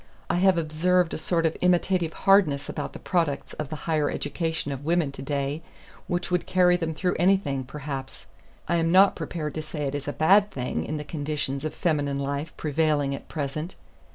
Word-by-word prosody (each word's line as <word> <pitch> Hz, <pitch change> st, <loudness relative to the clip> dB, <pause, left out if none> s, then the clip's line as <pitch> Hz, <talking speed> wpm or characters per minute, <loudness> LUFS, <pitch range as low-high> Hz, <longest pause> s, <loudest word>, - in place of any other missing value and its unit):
I -, -, +1 dB
have 190 Hz, 0 st, +4 dB
observed 170 Hz, +2 st, +1 dB
a -, -, -2 dB
sort 165 Hz, +1 st, 0 dB
of 160 Hz, -, +1 dB
imitative 180 Hz, -1 st, +2 dB
hardness 180 Hz, -8 st, +3 dB
about -, -, -4 dB
the -, -, -7 dB
products 165 Hz, -6 st, -1 dB
of 150 Hz, -3 st, -5 dB
the 155 Hz, -, -4 dB
higher 155 Hz, -3 st, +1 dB
education 160 Hz, -4 st, -2 dB
of 135 Hz, 0 st, -5 dB
women 165 Hz, -2 st, +1 dB
to 140 Hz, -, -9 dB
day 140 Hz, +2 st, -2 dB, 0.5 s
which 175 Hz, -1 st, -2 dB
would 180 Hz, -1 st, 0 dB
carry 180 Hz, -1 st, +4 dB
them 165 Hz, -2 st, -2 dB
through 180 Hz, +2 st, 0 dB
anything, 175 Hz, -7 st, +2 dB
perhaps. 135 Hz, 0 st, -7 dB, 0.4 s
I 170 Hz, -, +2 dB
am 165 Hz, 0 st, +1 dB
not 190 Hz, +2 st, +6 dB
prepared 155 Hz, -2 st, -4 dB
to 155 Hz, -, -3 dB
say 155 Hz, -1 st, -5 dB
it 140 Hz, -1 st, -2 dB
is 145 Hz, 0 st, -4 dB
a -, -, 0 dB
bad 200 Hz, +6 st, +5 dB
thing 125 Hz, -7 st, -3 dB
in 155 Hz, -, -3 dB
the 150 Hz, -, -4 dB
conditions 145 Hz, -2 st, -3 dB
of 155 Hz, -, -4 dB
feminine 145 Hz, -4 st, 0 dB
life 140 Hz, +2 st, -3 dB
prevailing 150 Hz, -2 st, +1 dB
at 140 Hz, -, -7 dB
present. 155 Hz, +3 st, -4 dB
155 Hz, 195 wpm, -26 LUFS, 145-175 Hz, 0.5 s, not